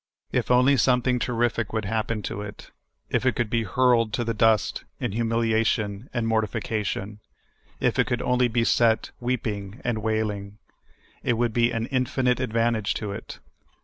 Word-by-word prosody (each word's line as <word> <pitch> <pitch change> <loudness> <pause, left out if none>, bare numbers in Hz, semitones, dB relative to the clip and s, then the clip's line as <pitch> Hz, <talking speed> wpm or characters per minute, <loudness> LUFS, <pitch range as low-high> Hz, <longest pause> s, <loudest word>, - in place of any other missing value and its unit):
If - - 0
only 125 +3 +5
something 125 -1 +2
terrific 120 -3 0
would 110 -2 -1
happen 110 +1 -2
to 105 - -4
it; 105 0 -9 0.4
if - - +1
it 130 -2 +2
could 115 -2 -1
be 115 - +2
hurled 115 +1 +2
to 120 - 0
the 115 0 -1
dust 110 -1 +2 0.2
in - - -2
humiliation 115 -1 0
and 120 -2 -1
mortification; 105 -2 -2 0.6
if - - +1
it - - +3
could - - 0
onl}^ 125 -1 +2
be 115 0 +2
set 115 -1 +2
weepni? 110 -4 -3
and 120 -2 -1
w^ailing, 105 -2 -2 0.7
it - - +1
would 120 -1 0
be 120 0 +3
an 115 -1 -2
infinite 125 -1 +1
advantage 115 -3 0
to 105 -2 -3
it. 100 - -7
115 Hz, 160 wpm, -25 LUFS, 110-120 Hz, 0.7 s, only